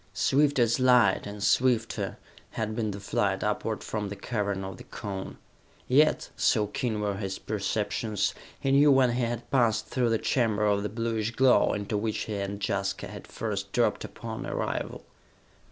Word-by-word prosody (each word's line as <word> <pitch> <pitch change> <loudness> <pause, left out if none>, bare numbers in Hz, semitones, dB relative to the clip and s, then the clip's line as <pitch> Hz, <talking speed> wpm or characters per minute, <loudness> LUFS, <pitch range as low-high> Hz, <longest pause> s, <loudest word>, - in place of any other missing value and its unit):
Swift 145 +1 +3
as 120 0 +3
light, 125 -7 +4
and 100 0 -6
swifter, 120 -2 +1 0.4
had 110 -1 -2
been 110 -2 -1
the 100 0 -5
flight 100 - 0
upward - - -1
from 105 -2 -3
the 100 - -5
Cavern 100 -4 -2
of 95 -1 -6
the - - -11
Cone; 100 -3 -6 0.5
yet, 150 +4 +3
so 110 -3 +2
keen 110 +1 -2
were 100 -2 -1
his 95 -2 -3
perceptions, 105 0 -1 0.3
he 135 - 0
knew 145 +1 +6
when 130 -2 +5
he 120 +2 -1
had 120 0 -2
passed 120 -5 +2
through 125 -2 0
the 115 - +2
chamber 110 -3 +1
of 100 -1 +2
the 105 - -2
bluish 115 0 -1
glow, 130 +2 +4
into 105 +1 -2
which 110 +1 -1
he 110 - -5
and 100 0 -3
Jaska 100 0 -2
had - - -9
first - - -4
dropped - - +1
upon - - -6
arrival. - - -3
110 Hz, 170 wpm, -28 LUFS, 100-120 Hz, 0.5 s, knew